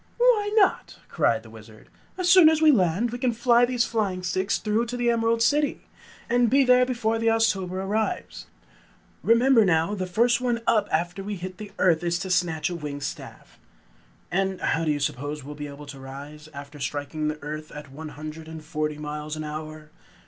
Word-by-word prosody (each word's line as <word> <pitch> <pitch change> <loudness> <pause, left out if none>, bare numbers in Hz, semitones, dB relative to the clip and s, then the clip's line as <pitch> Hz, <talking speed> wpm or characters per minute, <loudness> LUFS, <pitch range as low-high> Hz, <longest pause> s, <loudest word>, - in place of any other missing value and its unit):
"Why 475 -4 +3
not?" 405 -4 +2
cried - - +1
the - - -14
Wizard. - - -14 0.3
"As 365 -1 -1
soon 350 -3 +8
as 320 -1 +2
we 315 -1 +6
land, 200 - +1
we 245 - -5
can 250 -2 +1
fly 235 +1 +4
these 245 -1 0
flying 200 -5 -2
sticks 185 +2 0
straight 220 +2 0
to 245 +2 -4
the 240 -1 +2
Emerald 230 0 +1
City, 290 +4 +1 0.4
and 240 0 +3
be 275 +3 +4
there 250 0 +5
before 225 -3 -1
the 230 - 0
Oztober 225 -5 +1
arrives. 195 +4 -3 0.7
Remember 235 +1 +5
now, 165 0 +2
the 185 -3 -3
first 235 +6 +2
one 240 -2 0
up 210 -2 +2
after 175 +4 -1
we 205 +1 -4
hit 185 0 -8
the 210 -1 -8
earth 170 -2 +3
is 170 0 0
to 185 +1 -5
snatch 165 -3 +1
a - - -3
winged 145 -3 -6
staff." - - -8 0.7
"And 190 +1 0
how 165 0 0
do - - 0
you 145 - -1
suppose 145 +1 -3
we 140 - -10
will - - -6
be 145 0 -7
able 145 +1 -10
to 140 -1 -10
rise, 145 +3 -10
after 145 0 -10
striking 145 +3 -3
the 150 0 -2
earth 155 +1 -6
at 150 -2 -10
one 155 +3 -8
hundred 155 +2 -8
and 160 -1 -9
forty 155 -2 -3
miles 150 0 -5
an 155 - -5
hour?" 155 0 -7
185 Hz, 200 wpm, -25 LUFS, 155-235 Hz, 0.7 s, soon